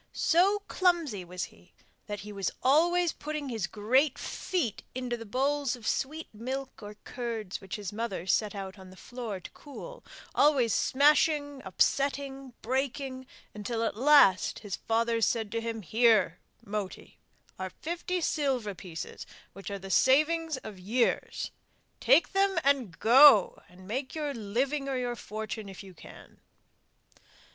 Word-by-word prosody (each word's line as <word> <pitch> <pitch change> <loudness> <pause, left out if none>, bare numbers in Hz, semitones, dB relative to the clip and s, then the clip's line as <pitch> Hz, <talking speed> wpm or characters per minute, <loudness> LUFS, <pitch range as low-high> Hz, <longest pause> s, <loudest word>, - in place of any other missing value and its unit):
So 390 +5 +3
clumsy 335 - +1
was 180 +1 -5
he 180 - -12 0.3
that 205 -2 -5
he 210 +2 -9
was 195 -2 -1
always 340 +5 +3
putting 300 -2 -5
his 220 -6 -2
great 255 +8 +2
feet 330 - -3
into 250 -1 -2
the 230 -2 -9
bowls 275 +3 0
of 235 -3 -13
sweet 310 +4 -2
milk 260 +5 -5
or 210 0 -9
curds 230 -6 -5
which 190 -1 -6
his 205 -2 -6
mother 210 -5 -4
set 210 +2 +1
out 195 0 -7
on 190 -1 -12
the 185 - -15
floor 235 -5 -6
to 180 - -11
cool, - - -11 0.3
always 275 -6 +3
smashing, 290 0 +3
upsetting, 275 +5 -1
breaking, 260 0 -2 0.3
until 225 +2 -3
at 225 - -1
last 255 - +5
his 205 -3 -5
father 230 0 0
said 220 -2 0
to 230 +1 -2
him: 225 -2 -4
'Here, 215 -2 +3 0.3
Moti, 205 -2 -6 0.4
are 190 0 -3
fifty 350 - -4
silver 265 -10 0
pieces 170 -3 -8 0.3
which 195 +1 -8
are 200 - -4
the 195 0 -8
savings 310 +5 +3
of 210 -3 -9
years; 230 +7 -1 0.5
take - - +4
them 390 -1 +2
and 265 -11 +1
go 245 -2 +7
and 185 +1 -15
make 260 +7 -4
your 300 -2 -2
living 265 +6 -2
or 265 - -1
your 245 -1 -2
fortune 215 -1 -6
if 195 +1 -10
you 190 -1 -12
can. - - -15
240 Hz, 150 wpm, -29 LUFS, 205-285 Hz, 0.5 s, go